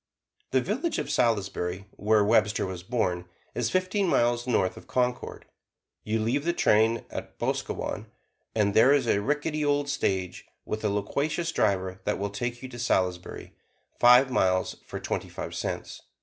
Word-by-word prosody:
The 130 - +2
village 255 - -1
of - - -2
Salisbury, 100 -5 0
where 105 0 +2
Webster 105 -1 +3
was 95 -2 -5
born, 90 -4 -1 0.3
is 120 -1 -1
fifteen 185 - +1
miles 120 -4 +2
north 95 -7 +1
of - - -13
Concord. 125 -1 -1 0.6
You 110 +1 -1
leave 120 +6 0
the 170 +1 +1
train 110 -5 +3
at - - -7
Boscowan, - - -3 0.5
and 105 -2 +2
there 120 +7 +6
is 140 -3 +2
a 100 -3 +2
rickety 150 +4 -1
old 145 0 +1
stage, 95 -8 -2 0.2
with 110 0 -4
a 105 - +2
loquacious 150 - -1
driver, 95 - 0
that 105 - 0
will 100 0 -3
take 120 +4 -4
you 130 - -6
to 120 -1 -9
Salisbury, 90 -6 -1 0.5
five 125 +2 +7
miles, 95 -6 +1
for - - -5
twenty - - -3
five - - -6
cents. - - -4
115 Hz, 160 wpm, -27 LUFS, 100-135 Hz, 0.6 s, five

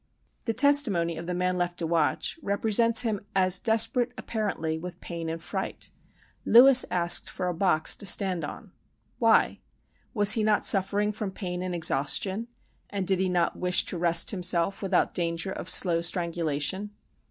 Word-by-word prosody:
The 225 - -1
testimony 235 - +3
of 165 +1 -8
the 180 - -3
man 180 0 -1
left 175 0 -3
to 170 - -3
watch 165 - -1
represents 225 +2 +2
him 220 -5 -3
as 185 -1 +3
desperate, 235 +2 +1
apparently, 165 -8 -4
with 175 +1 -9
pain 165 -2 -7
and 165 0 -5
fright. - - -6 0.5
"Lewis 255 +2 +6
asked 175 -1 0
for 180 - -5
a 180 - -2
box 165 -3 +2
to 200 - -7
stand 185 -2 +2
on:" 145 - -9 0.5
why? - - +2 0.6
Was 205 -1 +5
he 215 0 +1
not 210 -1 +1
suffering 200 +2 +1
from 210 -1 -5
pain 180 -2 -6
and 180 -1 -4
exhaustion, 175 - 0 0.4
and 200 -2 -4
did 190 0 0
he 190 0 0
not 175 -2 -1
wish 180 0 +1
to 180 - -5
rest 170 -1 +1
himself, 180 -1 0
without 190 -2 0
danger 170 +2 -2
of - - -7
slow 170 -3 +4
strangulation? 170 +2 -2
185 Hz, 165 wpm, -26 LUFS, 170-210 Hz, 0.6 s, Lewis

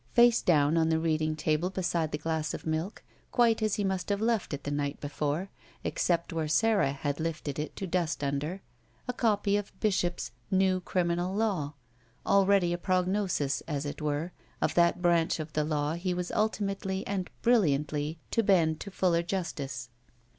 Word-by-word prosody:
Face 240 -1 +6
down 155 -2 +3
on 160 0 +3
the 160 - +3
reading 155 -1 0
table 155 +3 0
beside 175 -4 -1
the 150 - -1
glass 155 0 -2
of - - -9
milk, 160 +6 -2 0.3
quite 230 -2 +3
as 215 -2 +1
he 210 - -1
must 190 -1 -1
have 200 0 +1
left 225 -2 0
it 145 -1 -4
the 145 - -3
night 145 0 -2
before, 150 +5 -2 0.3
except 170 -1 0
where 160 -1 -1
Sara 200 -1 +3
had 140 +1 -3
lifted 155 -3 -3
it 150 - -4
to 195 - -4
dust 175 -3 -1
tmder, 145 +7 -2 0.5
a 250 - -1
copy 205 -4 +2
of 205 -1 -6
Bishop's 175 - 0 0.2
New 190 -1 +3
Criminal 175 +1 0
Law, 190 -10 0 0.5
already 195 -3 +4
a 175 - -3
prognosis, 185 -5 0
as 145 -2 -2
it 145 - -5
were, 150 +3 -1 0.3
of - - +1
that 170 +1 +3
branch 170 -1 +3
of 155 0 -6
the 155 - +1
law 150 0 0
he 180 +2 -2
was 180 0 -3
ultimately 195 -2 -1
and 195 -3 -2
brilliantly 155 - +2
to 230 - +3
bend 170 -7 +3
to 200 - -6
fuller 180 -3 +2
justice. 170 -6 -4
170 Hz, 175 wpm, -29 LUFS, 155-195 Hz, 0.5 s, Face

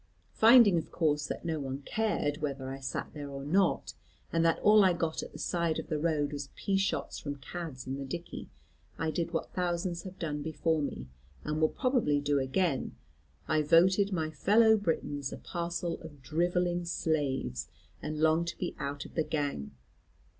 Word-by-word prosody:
Finding 225 -6 +7
of - - -8
course 150 -3 +1
that - - -5
no 160 -2 -1
one 135 0 -5
cared 210 -8 0
whether 140 -3 -3
I 135 - -6
sat 130 -1 -4
there 145 -2 -6
or 140 0 -6
not, 185 +5 +2 0.4
and 165 0 +3
that 165 -1 +3
all 210 0 +7
I 185 -2 +5
got 165 -2 -1
at - - -8
the - - -10
side 170 -2 0
of - - -5
the 155 - 0
road 150 -2 0
was 145 -1 -5
pea 195 -1 0
shots 195 +1 -1
from 145 -1 -4
cads 140 -1 -7
in 135 +1 -4
the 135 - -4
dickey, 170 +6 -6 0.5
I 160 -1 -1
did 170 +1 -1
what 165 - -3
thousands 175 -1 -1
have 190 0 -9
done 150 -4 -3
before 160 +1 0
me, 145 - -4 0.4
and 155 +1 -2
will 155 - +5
probably 245 - +1
do 145 0 +1
again, 135 +2 0 0.5
I 155 0 +2
voted 185 +6 +4
my 160 -4 -1
fellow 220 +6 +5
Britons 145 -8 -2
a - - -6
parcel 170 -1 -3
of 145 -5 -12
drivelling 175 +4 0
slaves, 135 - -1 0.3
and 155 0 -4
longed 160 +2 +3
to - - -4
be 180 - -3
out 140 0 -4
of - - -12
the 160 - +1
gang. 145 - -2
160 Hz, 185 wpm, -31 LUFS, 145-175 Hz, 0.5 s, Finding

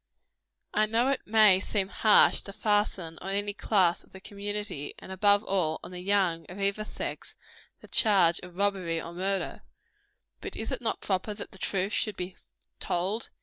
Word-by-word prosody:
I 215 0 +2
know 230 +4 +2
it 275 -1 -2
may 210 -3 +6
seem 195 -1 -1
harsh 215 +1 +5
to 200 - -8
fasten 205 -6 0
on 190 - -6
any 205 +1 -1
class 190 -5 +2
of - - -25
the 190 - -9
community, 205 -6 -4
and - - -10
above 205 +2 +3
all, 175 -7 0
on - - -9
the 180 - -7
young 185 -4 +1
of 185 +3 -9
either 200 +2 0
sex, - - -6 0.5
the - - -13
charge 190 -6 +4
of 180 -1 -11
robbery 190 -4 0
or 170 +1 -7
murder. 190 +2 -2 0.8
But 400 - -7
is 220 - -4
it - - -3
not 230 - -2
proper 200 +2 -2
that 205 - -8
the 190 - -13
truth 195 +2 -1
should 215 -3 0
be 180 0 -5 0.4
told? 190 +6 -1
200 Hz, 180 wpm, -28 LUFS, 180-210 Hz, 0.8 s, may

